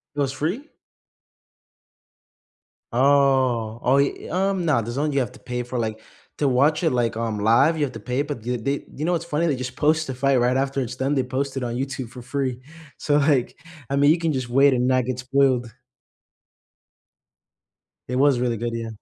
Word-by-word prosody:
It 145 - -2
was 135 -1 0
free? 185 - -3 2.2
Oh, 130 -4 +2
oh, 135 +2 +3
ye 140 - -1
um, 190 0 0
nah, 145 -7 +2
DAZN 135 +7 -2
you 140 - +1
have 125 0 -2
to 130 - -15
pay 125 0 -4
for 125 0 -5
like, 110 -1 -3 0.4
to 145 - +2
watch 145 +6 +2
it, 160 - +2
like, 120 -2 0
um, 115 -2 -2
live, 130 +10 +4
you 150 - -2
have 130 - -4
to - - -8
pay, 125 +3 -1
but 140 -6 -7
you 125 0 0
they 140 +5 -2
you 150 - -3
know 175 - +1
what's 170 -1 -1
funny? 165 +1 0
They 145 -5 +1
just 125 0 -5
post 155 +1 +2
the 130 - -4
fight 135 +1 +2
right 125 +2 +2
after 135 0 0
it's 125 -1 -4
done, 135 +2 0
they 135 - +2
post 135 +2 -3
it - - -4
on 120 0 -3
YouTube 130 -2 -4
for 125 0 -11
free. 130 -1 -3 0.4
So, 145 -1 +1
like, 140 -4 +1 0.3
I 140 - 0
mean, 145 +1 +5
you 165 - +4
can 165 -2 0
just 130 -3 -3
wait 135 +3 +4
and 125 0 +1
not 130 -1 +2
get 130 -1 -3
spoiled. 130 -2 +1 2.4
It 125 - -2
was 135 -2 +3
really 120 -2 0
good, 120 +1 -3
yeah. 115 -1 -4
130 Hz, 205 wpm, -23 LUFS, 125-145 Hz, 2.4 s, mean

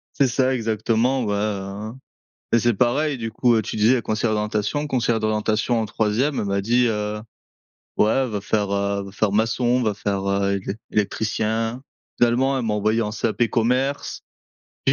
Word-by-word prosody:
C'est 140 - +3
ça, 130 +1 +1
exactement, 115 +2 0
bah, 105 -1 -1
hein, 105 +5 -7 0.5
et 115 - +6
c'est 120 0 +2
pareil 135 +6 +1
du 115 -1 -4
coup, 115 0 +3
tu 110 - -5
disais 115 +4 +4
conseillère 110 +1 0
d'orientation 105 +7 -1
conseillère 120 -4 0
d'orientation 110 +2 0
en 110 - -1
3e 115 +8 0
elle - - -2
m'a 100 0 0
dit: 120 +4 +2
«Heu, 105 -1 -2 0.8
ouais, 120 +5 +3
va 105 -3 -3
faire, 100 0 -1
heu, 100 0 -1
va 100 - -10
faire 105 0 0
maçon, 120 +3 +1
va 110 -3 0
faire, 100 -1 -2
heu, 100 0 +1
élec 100 +1 -4
électricien.» 110 +3 -1 0.4
Finalement, 130 +3 +2
elle 125 - -2
m'a 110 -2 0
envoyé 110 +2 +1
en 105 - -2
CAP 115 +2 0
commerce 130 +4 0 0.6
et - - +5
110 Hz, 170 wpm, -22 LUFS, 105-120 Hz, 0.8 s, et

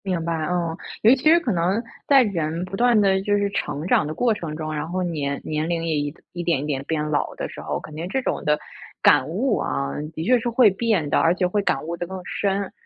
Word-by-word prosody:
明 180 -4 -1
白， 170 - -1
哦。 170 -1 -1 0.3
尤 225 +4 +8
其 255 - -9
是 335 +2 +7
可 310 -9 -2
能， 185 +5 +1 0.2
在 275 -2 +7
人 170 -4 -2
不 185 - -6
断 240 +1 +4
地 190 -2 +3
就 205 +1 +1
是 200 0 0
成 150 -4 -3
长 155 - +3
的 155 - -4
过 240 -2 +2
程 165 -7 -5
中， 155 0 -4
然 150 +1 -3
后 185 +1 -1
年 145 -5 -2
年 155 +1 -2
龄 170 -1 -1
也 160 -1 0
一 145 0 -2 0.2
一 175 -1 -4
点 165 -6 +1
一 - - -4
点 140 -3 -2
变 150 -1 -1
老 145 - -1
的 - - -4
时 - - -9
候， - - -3
肯 155 - -11
定 165 +3 -4
这 265 +6 0
种 - - -2
的 150 0 +2 0.4
感 - - +5
悟， - - 0
啊， 70 0 -2 0.2
的 160 - -4
确 250 +7 +4
是 240 - -2
会 235 -1 +5
变 195 -6 0
的 - - +3
而 165 +2 +3
且 180 - +1
会 205 +3 0
感 135 -8 0
悟 170 +1 -3
得 175 - -4
更 190 +1 -6
深。 195 0 -1
175 Hz, 275 characters per minute, -23 LUFS, 155-205 Hz, 0.4 s, 尤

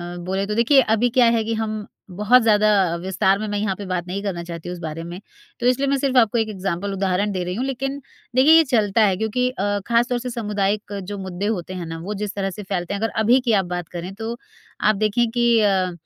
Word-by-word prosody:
अ, - - -7
बोले 190 +2 -1
तो 210 +1 -3
देखिए 265 +4 +5
अभी 225 +1 +1
क्या 250 0 +4
है 220 - 0
कि 230 - -2
हम 215 -2 -3 0.2
बहुत 210 +7 +4
ज़्यादा 215 -1 +4 0.2
अ, - - -1
विस्तार 190 +2 +1
में 215 - -3
मैं 205 0 -2
यहाँ 200 -2 -1
पे 200 +1 -8
बात 180 -1 -3
नहीं 190 +3 -4
करना 175 -4 -3
चाहती 170 0 -7
हूँ 180 - -4
उस 175 - -11
बारे 160 +1 -5
में। 175 +2 -7 0.4
तो 240 - -3
इसलिए 270 +2 +2
मैं 275 - +2
सिर्फ़ 265 -1 0
आपको 230 -1 +4
एक 220 -1 0
एक्ज़ाम्पल 195 0 -3
उदाहरण 195 +1 0
दे 185 -2 -2
रही 180 +1 -4
हूँ 250 - -2
लेकिन 270 +1 -3 0.3
देखिए 275 +5 +6
ये 325 - +7
चलता 215 0 +2
है 195 - +2
क्योंकि 250 +4 0
अ, 205 -4 -1
खास 235 +1 +3
तौर 245 -1 0
से 250 +1 -5
सामुदायिक 210 -2 -2
जो 205 +2 -6
मुद्दे 190 0 -5
होते 180 +1 -7
हैं 180 -2 -5
ना? 165 0 -6
वो 195 +5 -5
जिस 205 -1 -4
तरह 195 -1 -1
से 205 +3 -8
फ़ैलते 185 -1 -3
हैं 200 - -4
अगर 225 -1 -1
अभी 245 +4 +5
की 230 - +4
आप - - -7
बात 175 -2 -5
करें 180 +3 -6
तो 225 +2 -5 0.4
आप 215 - +3
देखें 215 +3 +1
कि 240 -1 +3
अ, 190 -3 +2
205 Hz, 260 wpm, -22 LUFS, 190-235 Hz, 0.4 s, ये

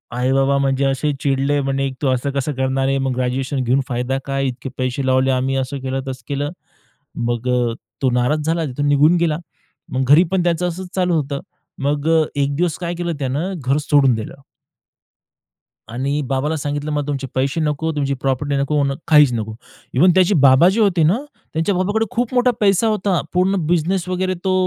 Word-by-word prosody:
आई-बाबा 135 +2 +2
म्हणजे 135 0 +1
असे 135 +2 0
चिडले, 140 +1 +1
म्हणे, 135 0 -1
"तू 140 - +1
असं 130 +2 0
कसं 140 +2 -2
करणार 130 0 0
आहे? 135 - +1
मग 135 -1 -1
ग्रॅज्युएशन 130 +2 -1
घेऊन 130 +3 +2
फायदा 125 +1 -2
काय, 135 0 -1
इतके 130 +1 -5
पैसे 130 +1 -2
लावले 130 0 +3
आम्ही," 130 +1 0
असं 135 +1 -3
केलं, 135 0 -2
तसं 130 -2 -6
केलं. 145 +1 -2 0.8
मग 120 +1 -2
अ, 120 -2 +1 0.3
तो 130 - +4
नाराज 140 +5 +1
झाला, 165 0 0
तिथून 145 +2 -2
निघून 145 +4 +4
गेला. 165 -2 +1 0.5
मग 130 +1 0
घरी 160 +4 +8
पण 185 -2 +1
त्याचं 175 +1 +1
असंच 180 +2 -6
चालू 180 -2 +1
होतं. 140 -2 -2 0.4
मग 145 +1 0
अ, 160 -1 +4 0.2
एक 140 0 0
दिवस 170 0 0
काय 175 -1 -3
केलं 170 0 -2
त्यानं? 145 +8 -2
घर 135 +3 +2
सोडून 135 -5 +4
दिलं. 110 - -6 1.6
आणि 140 +5 -2
बाबाला 140 +4 -1
सांगितलं, 145 +1 -3
"मला 145 -1 -2
तुमचे 135 -2 -3
पैसे 135 +5 0
नको, 155 +1 -1
तुमची 140 -2 0
प्रॉपर्टी 140 +1 -1
नको," 140 +2 0
म्हणं, 140 -1 +1
"काहीच 150 -5 +6
नको." 110 -1 -3 0.4
इव्हन 175 +8 +5
त्याची 185 +2 +4
बाबा 130 +7 +6
जे 220 +4 +1
होते 185 -5 +3
ना, 175 +9 +3 0.4
त्यांच्या 165 +5 0
बाबाकडे 205 +5 0
खूप 245 +1 -1
मोठा 250 0 +3
पैसा 200 +1 +3
होता. 200 -4 +1
पूर्ण 185 +2 +2
बिझनेस 175 +2 0
वगैरे 185 0 -1
तो 190 - +1
140 Hz, 185 wpm, -19 LUFS, 135-170 Hz, 1.6 s, घरी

